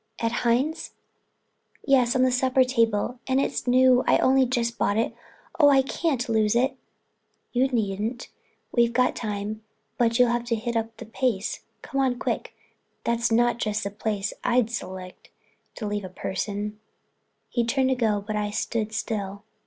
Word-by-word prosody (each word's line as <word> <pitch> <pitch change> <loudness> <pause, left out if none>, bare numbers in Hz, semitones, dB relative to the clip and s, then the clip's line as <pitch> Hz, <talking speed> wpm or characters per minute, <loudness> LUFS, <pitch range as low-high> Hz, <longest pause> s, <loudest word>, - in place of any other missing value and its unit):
"At 230 0 -1
Hines'?" 250 +6 0 0.9
"Yes, 255 -3 +3
on 255 - +4
the 255 - +3
supper 260 +1 +3
table. 230 -1 0
And 260 0 +2
it's 275 - -2
new, 255 0 +5
I'd - - +4
only 265 0 +4
just 235 -2 -1
bought 205 - +1
it. 225 - 0 0.5
Oh, 290 -2 +7
I 270 -1 +5
can't 275 -2 -1
lose 220 -1 +2
it." 260 +2 +2 0.8
"You 255 +2 +3
needn't. 225 0 -2 0.4
We've 235 -1 +3 0.2
time, 210 0 -4 0.4
but 230 -1 +3
you'll 245 -2 +5
have 240 0 -1
to 235 -1 0
hit 235 +2 -3
up 225 0 -2
the 235 - -8
pace. 225 -2 -1 0.2
Come 275 - -1
on 255 -2 +1
quick—that's 235 -1 -4
not 240 +1 +3
just 215 -1 -1
the 200 - -3
place 210 -1 -2
I'd 240 -2 +2
select 185 -5 -7 0.5
to 220 - -5
leave 205 0 -2
a 185 - -6
purse 185 +1 -3
in." 210 +1 -4 0.7
He 240 - 0
turned 260 +3 +1
to 260 - +2
go 215 -4 0
but 215 0 -3
I 210 0 -1
stood 220 +1 -2
still. 205 -2 -3
235 Hz, 165 wpm, -25 LUFS, 215-255 Hz, 0.9 s, Oh